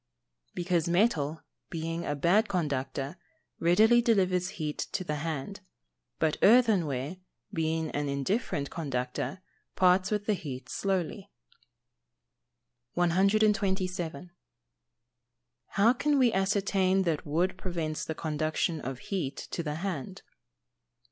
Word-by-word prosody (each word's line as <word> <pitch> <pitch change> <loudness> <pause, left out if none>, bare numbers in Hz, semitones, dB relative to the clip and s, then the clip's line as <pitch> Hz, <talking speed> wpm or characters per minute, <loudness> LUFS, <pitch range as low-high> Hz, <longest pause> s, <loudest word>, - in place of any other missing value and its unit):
_ - - -40
Because 175 -2 0
metal, 170 -5 +1 0.3
being 165 +1 -3
a 145 - -1
good 185 +9 +3
conductor, 140 -3 -2 0.4
readily 220 +8 +5
delivers 185 -6 +2
heat 150 -1 -3
to 185 - -1
the 150 -4 -2
hand; 160 +5 -4 0.6
but 155 -1 +1
earthenware, 185 - +4 0.4
being 160 -1 -1
an 145 -1 -2
indifferent 140 - -1
conductor, 135 +4 -3 0.3
parts 185 +1 +4
with 210 -1 -1
the 215 - +2
heat 130 -8 -6
slowly. 195 +1 -2 1.6
127. 185 -2 +1 1.4
_How 230 +5 +4
can 295 -1 +2
we 250 -4 +4
ascertain 195 -1 +2
that 165 -4 0
wood 175 +5 0
prevents 170 -5 -3
the 160 - -4
conduction 155 +1 -1
of 130 +1 -4
heat 140 -2 -3
to - - -2
the 150 -2 -3
hand? 185 +1 -4
175 Hz, 110 wpm, -29 LUFS, 150-195 Hz, 1.6 s, readily